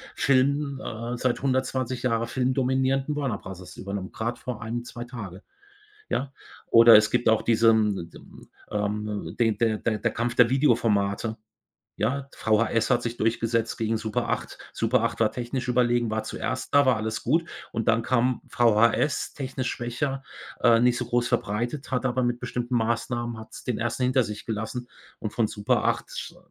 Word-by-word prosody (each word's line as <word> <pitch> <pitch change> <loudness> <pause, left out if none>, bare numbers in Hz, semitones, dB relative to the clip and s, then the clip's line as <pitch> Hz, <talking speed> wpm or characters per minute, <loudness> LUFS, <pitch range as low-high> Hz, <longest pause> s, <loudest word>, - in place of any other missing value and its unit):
Film, 140 +1 +2
äh 115 +2 -4
seit 130 +2 -1
120 130 -1 -1
Jahre 115 -2 +1
filmdominierenden 130 +2 0
Warner 135 -8 -1
Bros. 95 -1 -10
übernommen, 100 -1 -5
grad 115 +2 -3
vor 125 -3 -6
1, 120 +1 -3
2 120 0 -7
Tage, 105 -7 -8 0.7
ja. 135 +1 -1 0.3
Oder 115 -1 +8
es 110 0 +4
gibt 120 - +2
auch 110 - +3
diesen, 110 -6 +3
d - - -13
düm - - -16 0.2
ähm, 105 0 -3
den 115 -3 +2
der 110 -1 +1
der 110 -2 -1
der - - 0
Kampf 120 +1 -2
der 120 -1 +5
Videoformate, 115 -5 +1 0.6
ja? 135 +6 -1
VHS 115 +2 +1
hat 120 - +3
sich 120 0 -3
durchgesetzt 115 0 0
gegen 110 0 0
Super 110 -1 -2
8. - - -3 0.2
Super 115 +1 +1
8 115 -1 -1
war 110 - +3
technisch 125 +1 -4
überlegen, 120 -2 +2
war 110 - -1
zuerst 130 +3 -4
da, 145 -1 +6
war 130 - +5
alles 110 +1 -3
gut. 160 +7 +2 0.3
Und 115 -1 -2
dann 115 0 +3
kam 125 0 +1
VHS, 115 +3 +2
technisch 130 -2 -3
schwächer, 135 +3 -3 0.4
äh, 115 -2 +6
nicht 120 0 +3
so 125 - -3
groß 120 0 +1
verbreitet, 120 +5 -2
hat 130 0 0
aber 130 +1 0
mit 120 0 0
bestimmten 120 0 -2
Maßnahmen 120 +1 -1
hat 110 - -11
es - - -10
den 125 -3 -2
1. 120 +2 -1
hinter 130 +1 +3
sich 105 -2 -6
gelassen. 110 +3 -4 0.3
Und 110 - -5
von 110 -3 +1
Super 105 -1 0
8 - - -2
120 Hz, 170 wpm, -26 LUFS, 110-125 Hz, 0.7 s, Oder